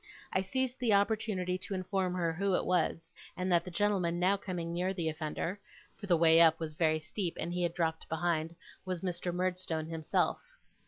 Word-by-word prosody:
I 190 Hz, -, +2 dB
seized 260 Hz, +6 st, -2 dB
the 230 Hz, -5 st, +3 dB
opportunity 200 Hz, -3 st, 0 dB
to 195 Hz, +1 st, -4 dB
inform 185 Hz, -1 st, -1 dB
her 170 Hz, -2 st, 0 dB
who 195 Hz, +2 st, +1 dB
it -, -, 0 dB
was; 165 Hz, -2 st, 0 dB, 0.2 s
and 185 Hz, 0 st, -1 dB
that 170 Hz, -1 st, +4 dB
the 180 Hz, -, -7 dB
gentleman 180 Hz, -3 st, +1 dB
now 185 Hz, +3 st, +4 dB
coming 175 Hz, -4 st, -4 dB
near 185 Hz, +2 st, -1 dB
the 165 Hz, -3 st, 0 dB
offender 160 Hz, +4 st, -3 dB, 0.4 s
(for 205 Hz, -, -9 dB
the 175 Hz, -3 st, +4 dB
way 165 Hz, 0 st, +6 dB
up 160 Hz, -1 st, +6 dB
was 160 Hz, -2 st, -4 dB
very 155 Hz, 0 st, +2 dB
steep, 170 Hz, +3 st, -4 dB
and 170 Hz, +2 st, -3 dB
he 180 Hz, -, -1 dB
had 170 Hz, -1 st, 0 dB
dropped 160 Hz, -2 st, -1 dB
behind), 165 Hz, 0 st, -1 dB, 0.3 s
was 185 Hz, -2 st, -3 dB
Mr. 175 Hz, -1 st, -2 dB
Murdstone 180 Hz, -3 st, -1 dB
himself. 160 Hz, -1 st, 0 dB
175 Hz, 195 wpm, -32 LUFS, 165-190 Hz, 0.4 s, way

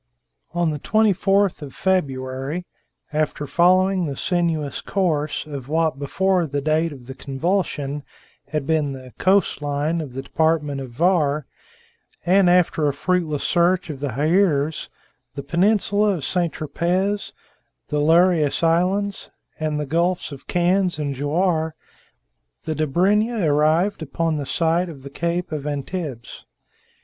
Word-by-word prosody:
On 170 Hz, -2 st, +1 dB
the 150 Hz, -, -4 dB
24th 200 Hz, -1 st, +2 dB
of 140 Hz, -3 st, -9 dB
February, 135 Hz, -2 st, -1 dB, 0.5 s
after 150 Hz, -1 st, -1 dB
following 185 Hz, +3 st, +3 dB
the 140 Hz, -, -4 dB
sinuous 165 Hz, -3 st, -1 dB
course 155 Hz, -7 st, -1 dB
of 140 Hz, -4 st, -7 dB
what 160 Hz, -3 st, +1 dB
before 180 Hz, +4 st, +1 dB
the 145 Hz, 0 st, -2 dB
date 155 Hz, +3 st, +1 dB
of 130 Hz, -4 st, -11 dB
the 130 Hz, -, -7 dB
convulsion 145 Hz, 0 st, -2 dB, 0.5 s
had 150 Hz, 0 st, -3 dB
been 150 Hz, -2 st, +1 dB
the 130 Hz, -1 st, -11 dB
coast 190 Hz, -4 st, +2 dB
line 145 Hz, +3 st, -1 dB
of 140 Hz, -5 st, -7 dB
the 135 Hz, -, -4 dB
department 150 Hz, -3 st, 0 dB
of 130 Hz, -, -7 dB
Var, 150 Hz, 0 st, +1 dB, 0.8 s
and 185 Hz, +1 st, +5 dB
after 175 Hz, -4 st, +3 dB
a 145 Hz, -, +1 dB
fruitless 160 Hz, -1 st, -1 dB
search 175 Hz, 0 st, +2 dB
for 140 Hz, +2 st, -4 dB
Hyeres, 155 Hz, -, +1 dB, 0.5 s
the 140 Hz, -, -5 dB
peninsula 205 Hz, +5 st, +2 dB
of 155 Hz, -, -5 dB
St. 175 Hz, -3 st, 0 dB
Tropez, 180 Hz, +7 st, -1 dB, 0.6 s
the 150 Hz, -, 0 dB
Lerius 165 Hz, -1 st, +3 dB
Islands, 185 Hz, +5 st, +1 dB, 0.3 s
and 155 Hz, -1 st, -1 dB
the 150 Hz, -, -2 dB
gulfs 170 Hz, +4 st, 0 dB
of 140 Hz, -1 st, -11 dB
Cannes 180 Hz, 0 st, +1 dB
and 145 Hz, -2 st, -2 dB
Jouar, 160 Hz, +3 st, 0 dB, 0.9 s
the 160 Hz, -, -2 dB
Dobryna 190 Hz, -, +1 dB
arrived 155 Hz, +6 st, +2 dB
upon 160 Hz, +1 st, -1 dB
the 140 Hz, -2 st, -4 dB
site 170 Hz, 0 st, +1 dB
of 140 Hz, -5 st, -10 dB
the 140 Hz, -, -9 dB
Cape 170 Hz, +3 st, -2 dB
of 150 Hz, -2 st, -4 dB
Antibes. 145 Hz, -3 st, -5 dB
160 Hz, 135 wpm, -22 LUFS, 145-180 Hz, 0.9 s, and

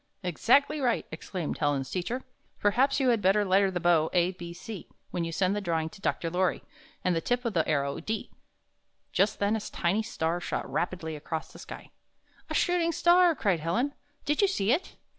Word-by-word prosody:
''Exactly 275 Hz, -, +3 dB
right!" 245 Hz, -3 st, +1 dB
exclaimed 165 Hz, +1 st, -4 dB
Helen's 145 Hz, -3 st, 0 dB
teacher. 230 Hz, +8 st, -2 dB, 0.4 s
"Perhaps 260 Hz, +7 st, +3 dB
you 265 Hz, -2 st, +3 dB
had 230 Hz, -3 st, +3 dB
better 200 Hz, +2 st, +3 dB
letter 195 Hz, +1 st, +4 dB
the 180 Hz, -2 st, -2 dB
bow, 165 Hz, -2 st, +3 dB
a, 180 Hz, 0 st, +3 dB
b, 175 Hz, -2 st, -8 dB
c, 190 Hz, +2 st, -8 dB, 0.2 s
when 175 Hz, -, -1 dB
you 165 Hz, -, -3 dB
send 185 Hz, +3 st, +1 dB
the 205 Hz, -, -1 dB
drawing 165 Hz, -4 st, -1 dB
to 195 Hz, -, -15 dB
Dr. 165 Hz, -3 st, -1 dB
Lorry, 180 Hz, +1 st, 0 dB, 0.4 s
and 180 Hz, -1 st, +2 dB
the 165 Hz, -, 0 dB
tip 245 Hz, +6 st, -1 dB
of 230 Hz, -, 0 dB
the 165 Hz, -4 st, +1 dB
arrow, 140 Hz, -2 st, 0 dB
d." 215 Hz, +5 st, -4 dB, 0.8 s
Just 195 Hz, +3 st, +2 dB
then 205 Hz, +2 st, +1 dB
a -, -, -1 dB
tiny 190 Hz, +2 st, 0 dB
star 170 Hz, -6 st, -2 dB
shot -, -, -3 dB
rapidly 170 Hz, -2 st, -2 dB
across 155 Hz, +1 st, -5 dB
tlie -, -, -12 dB
sky. -, -, -10 dB, 0.6 s
"A -, -, -3 dB
shooting 350 Hz, -1 st, +2 dB
star!" 345 Hz, +1 st, +5 dB
cried 195 Hz, -, +1 dB
Helen. 230 Hz, -, 0 dB, 0.3 s
"Did 295 Hz, +5 st, +1 dB
you 400 Hz, -, +5 dB
see 220 Hz, -, +1 dB
it?" 310 Hz, +8 st, 0 dB
190 Hz, 195 wpm, -28 LUFS, 170-240 Hz, 0.8 s, star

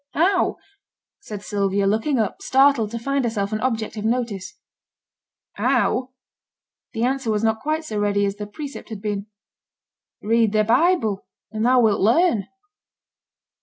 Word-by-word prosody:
'How?' 365 Hz, +6 st, +2 dB, 0.6 s
said 210 Hz, -, -8 dB
Sylvia, 200 Hz, -1 st, 0 dB
looking 220 Hz, +8 st, +1 dB
up, 215 Hz, -4 st, -1 dB
startled 270 Hz, -5 st, +3 dB
to 230 Hz, -, -5 dB
find 275 Hz, +3 st, -1 dB
herself 215 Hz, -3 st, -2 dB
an 215 Hz, -, -1 dB
object 225 Hz, -4 st, -2 dB
of 210 Hz, -, -4 dB
notice. 220 Hz, -5 st, -2 dB, 1.0 s
'How?' 255 Hz, 0 st, +1 dB, 0.8 s
(The 225 Hz, -, -2 dB
answer 265 Hz, -1 st, 0 dB
was 215 Hz, 0 st, 0 dB
not 220 Hz, 0 st, +1 dB
quite 310 Hz, +1 st, -2 dB
so 215 Hz, -7 st, -3 dB
ready 205 Hz, 0 st, +1 dB
as 200 Hz, 0 st, -3 dB
the 210 Hz, 0 st, -6 dB
precept 280 Hz, +6 st, -8 dB
had 220 Hz, -3 st, -6 dB
been.) 205 Hz, -1 st, -3 dB, 1.0 s
'Read 225 Hz, 0 st, +2 dB
thy 215 Hz, 0 st, +3 dB
Bible, 225 Hz, -, +2 dB, 0.2 s
and 215 Hz, 0 st, -3 dB
thou 250 Hz, +1 st, +4 dB
wilt 215 Hz, -3 st, +2 dB
learn.' 230 Hz, -, +3 dB
225 Hz, 145 wpm, -22 LUFS, 205-260 Hz, 1.0 s, thou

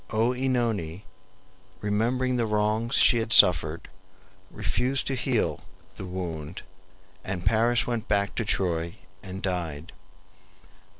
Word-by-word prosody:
OEnone, 115 Hz, -7 st, -1 dB, 0.8 s
remembering 120 Hz, +5 st, 0 dB
the 120 Hz, -2 st, 0 dB
wrongs 105 Hz, +3 st, 0 dB
she 120 Hz, -, +6 dB
had 115 Hz, 0 st, -3 dB
suffered, 80 Hz, -6 st, +5 dB, 0.6 s
refused 125 Hz, +6 st, -1 dB
to 135 Hz, -, -1 dB
heal 125 Hz, -2 st, -1 dB, 0.3 s
the 95 Hz, -, -7 dB
wound, 85 Hz, -3 st, -6 dB, 0.6 s
and 90 Hz, -2 st, -5 dB
Paris 120 Hz, +2 st, +2 dB
went 120 Hz, -2 st, -3 dB
back 100 Hz, -1 st, 0 dB
to -, -, -2 dB
Troy 85 Hz, -5 st, -1 dB, 0.3 s
and 95 Hz, 0 st, -8 dB
died. 85 Hz, -4 st, -4 dB
105 Hz, 110 wpm, -26 LUFS, 90-120 Hz, 0.8 s, she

